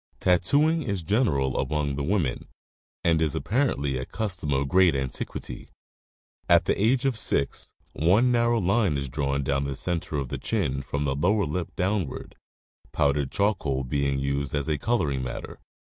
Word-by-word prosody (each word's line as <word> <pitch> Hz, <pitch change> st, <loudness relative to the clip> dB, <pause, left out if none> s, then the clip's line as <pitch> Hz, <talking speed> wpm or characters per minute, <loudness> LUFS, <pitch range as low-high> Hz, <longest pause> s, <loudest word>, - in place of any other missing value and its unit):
Tattoomg 145 Hz, -, +3 dB
is 100 Hz, -, -3 dB
general 75 Hz, -, +1 dB
among 75 Hz, -2 st, -1 dB
the 70 Hz, -, -3 dB
women, 75 Hz, -5 st, -1 dB, 0.6 s
and 80 Hz, -1 st, +3 dB
is 80 Hz, -3 st, +1 dB
apparently 100 Hz, -, 0 dB
a 65 Hz, -, -4 dB
custom 95 Hz, -9 st, -3 dB
of 70 Hz, 0 st, +1 dB
great 90 Hz, -1 st, +4 dB
antiquity. 65 Hz, -1 st, -5 dB, 0.8 s
At -, -, +5 dB
the -, -, +2 dB
age 120 Hz, +6 st, +2 dB
of 135 Hz, -3 st, +2 dB
six 70 Hz, -8 st, 0 dB, 0.2 s
one 100 Hz, +11 st, +3 dB
narrow 120 Hz, -1 st, +2 dB
line 95 Hz, -4 st, +2 dB
is 70 Hz, -1 st, -4 dB
drawn 70 Hz, +1 st, -1 dB
down 70 Hz, +1 st, 0 dB
the 70 Hz, -1 st, -3 dB
center 85 Hz, 0 st, -2 dB
of 70 Hz, -3 st, -3 dB
the -, -, -4 dB
chin 70 Hz, +1 st, -1 dB
from 70 Hz, +2 st, -3 dB
the 70 Hz, -, 0 dB
lower 100 Hz, +7 st, +2 dB
lip 85 Hz, +3 st, -4 dB
down 95 Hz, -2 st, 0 dB
ward, -, -, -9 dB, 0.6 s
powdered 70 Hz, -2 st, +1 dB
charcoal 80 Hz, -10 st, 0 dB
being 70 Hz, +1 st, 0 dB
used 70 Hz, +1 st, -2 dB
as 70 Hz, 0 st, -1 dB
coloring 75 Hz, -, 0 dB
matter. 65 Hz, -1 st, -6 dB
75 Hz, 160 wpm, -26 LUFS, 70-100 Hz, 0.8 s, At